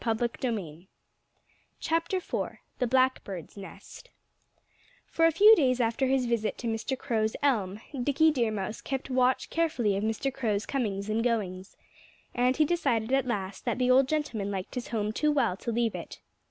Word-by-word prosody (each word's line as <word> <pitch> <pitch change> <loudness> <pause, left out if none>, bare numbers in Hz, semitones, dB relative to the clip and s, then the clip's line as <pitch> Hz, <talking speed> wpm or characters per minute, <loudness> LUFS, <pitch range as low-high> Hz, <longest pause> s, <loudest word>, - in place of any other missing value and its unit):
IV 225 -2 0
THE 210 - -3 2.0
BLACKBIRD'S 255 - 0
NEST 200 - -11 1.0
For 330 - +1
a - - +3
few 420 +7 +8
days 255 - +2
after 235 +3 +1
his 260 -1 +2
visit 235 -2 -1
to 240 - -5
Mr. 225 +4 -2
Crow's 220 -3 -1
elm, 210 -8 +1 0.2
Dickie 290 +5 +3
Deer 240 -6 +1
Mouse 215 0 -4
kept 270 0 -4
watch 255 0 +1
carefully 280 -11 +1
of 200 - -2
Mr. 225 +5 -1
Crow's 215 -6 -1
comings 205 -7 -2
and 220 +1 0
goings. 195 -6 -2 0.6
And 250 +1 +2
he 310 - +4
decided 245 -9 0
at 270 -2 +2
last 195 -5 -3
that 240 -2 0
the 250 0 +2
old 260 +1 +5
gentleman 265 -10 -2
liked 190 -2 -5
his 250 - -4
home 215 -2 -1
too 300 +7 +1
well 245 -10 +1
to 235 - -4
leave 230 -1 0
it. - - -8
235 Hz, 160 wpm, -28 LUFS, 215-265 Hz, 2.0 s, few